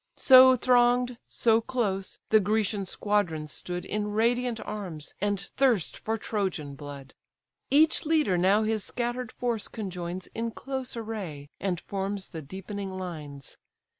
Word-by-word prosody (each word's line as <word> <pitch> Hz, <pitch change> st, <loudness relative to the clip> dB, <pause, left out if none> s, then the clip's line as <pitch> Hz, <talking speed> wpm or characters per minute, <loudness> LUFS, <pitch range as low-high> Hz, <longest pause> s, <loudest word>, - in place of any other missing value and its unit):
So 260 Hz, -1 st, +8 dB
throng'd, 245 Hz, 0 st, +3 dB
so 225 Hz, -1 st, +3 dB
close, 215 Hz, -6 st, -2 dB
the 220 Hz, -, +7 dB
Grecian 205 Hz, -1 st, 0 dB
squadrons 170 Hz, -8 st, 0 dB
stood 180 Hz, 0 st, -4 dB
In 210 Hz, +1 st, -2 dB
radiant 235 Hz, +1 st, +1 dB
arms, 185 Hz, -8 st, -5 dB
and 205 Hz, -1 st, +1 dB
thirst 225 Hz, -, +1 dB
for 225 Hz, +1 st, -2 dB
Trojan 190 Hz, -10 st, -2 dB
blood. 140 Hz, -1 st, -9 dB, 0.6 s
Each 310 Hz, +3 st, +4 dB
leader 305 Hz, -, +2 dB
now 190 Hz, +5 st, +4 dB
his 215 Hz, -1 st, 0 dB
scatter'd 240 Hz, +1 st, -3 dB
force 235 Hz, -4 st, -2 dB
conjoins 180 Hz, -4 st, -5 dB
In 230 Hz, +1 st, -2 dB
close 265 Hz, +1 st, -5 dB
array, 195 Hz, -11 st, -5 dB
and 185 Hz, -3 st, -1 dB
forms 195 Hz, +1 st, -4 dB
the 160 Hz, -, -6 dB
deepening 195 Hz, +6 st, -6 dB
lines. 150 Hz, -7 st, -7 dB
205 Hz, 135 wpm, -28 LUFS, 180-235 Hz, 0.6 s, So